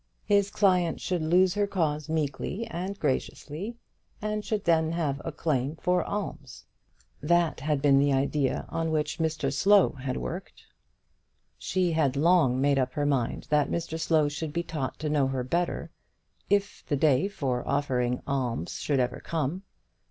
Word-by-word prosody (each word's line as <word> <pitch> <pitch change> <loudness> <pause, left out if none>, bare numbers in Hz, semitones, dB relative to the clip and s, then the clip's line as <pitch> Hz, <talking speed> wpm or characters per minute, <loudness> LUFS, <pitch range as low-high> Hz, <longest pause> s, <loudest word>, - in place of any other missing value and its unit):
His 200 -1 +3
client 180 -5 +2
should 180 -3 -1
lose 175 +3 +4
her 205 -1 +1
cause 155 -5 -1
meekly 160 +7 -2
and 195 -2 -5
graciously, 155 - -3 0.4
and 210 0 -2
should 210 -2 -2
then 160 -1 +2
have 145 -5 -1
a 165 - -4
claim 150 -2 -1
for 180 +2 +1
alms. 155 -10 -5 0.6
That 170 0 +2
had 145 0 -1
been 140 -2 +5
the 140 0 +3
idea 135 0 0
on 165 0 -1
which 155 +1 -1
Mr 155 -4 -1
Slow 200 +6 +5
had 130 -2 -4
worked. 180 +3 -6 1.0
She 185 -2 0
had 150 -5 +1
long 150 -4 +4
made 140 0 +3
up 130 -1 0
her 145 - -1
mind 135 -6 0
that 150 -1 +3
Mr 165 -1 -3
Slow 160 -2 +3
should 150 +1 -4
be 170 +1 -1
taught 150 -6 -4
to 155 - -4
know 145 -3 +2
her 130 -1 -2
better, 170 +7 -2 0.6
if 200 0 0
the 145 - 0
day 145 +3 +3
for 135 -11 -2
such - - -12
offering 130 -4 +1
of - - -12
alms 125 -10 -2
should 140 -3 0
ever 125 0 0
come. 165 +2 -2
155 Hz, 165 wpm, -28 LUFS, 140-175 Hz, 1.0 s, been